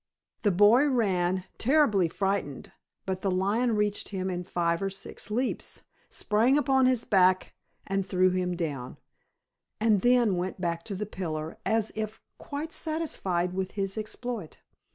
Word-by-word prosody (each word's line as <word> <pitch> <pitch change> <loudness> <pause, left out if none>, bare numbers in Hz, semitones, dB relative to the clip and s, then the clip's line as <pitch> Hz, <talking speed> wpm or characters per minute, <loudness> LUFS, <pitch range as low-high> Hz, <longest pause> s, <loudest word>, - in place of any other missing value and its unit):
The 210 - +3
boy 210 +9 +5
ran, 190 -8 +1 0.2
terribly 230 - +3
frightened; 190 -5 -2 0.3
but 190 -1 -3
the 195 - 0
lion 205 +6 +1
reached 210 -1 0
him 190 -2 -3
in 180 0 -3
five 170 -1 0
or 195 - 0
six 195 +1 -8
leaps, 245 +5 -2 0.3
sprang 230 +7 +2
upon 265 -2 +3
his 255 -2 +2
back 185 -4 +3 0.3
and 195 0 0
threw 185 0 +2
him 180 -1 -1
down, 145 -7 -4 0.8
and 215 -3 +3
then 240 -5 +4
went 185 +2 -3
back 170 -2 -2
to 200 - -4
the 210 +3 -3
pillar 160 -5 -5
as 220 -1 +1
if 215 0 -4 0.2
quite 300 +3 -5
satisfied 195 - -1
with 190 0 -3
his 195 -1 -2
exploit. 220 -3 -5
195 Hz, 150 wpm, -28 LUFS, 180-230 Hz, 0.8 s, boy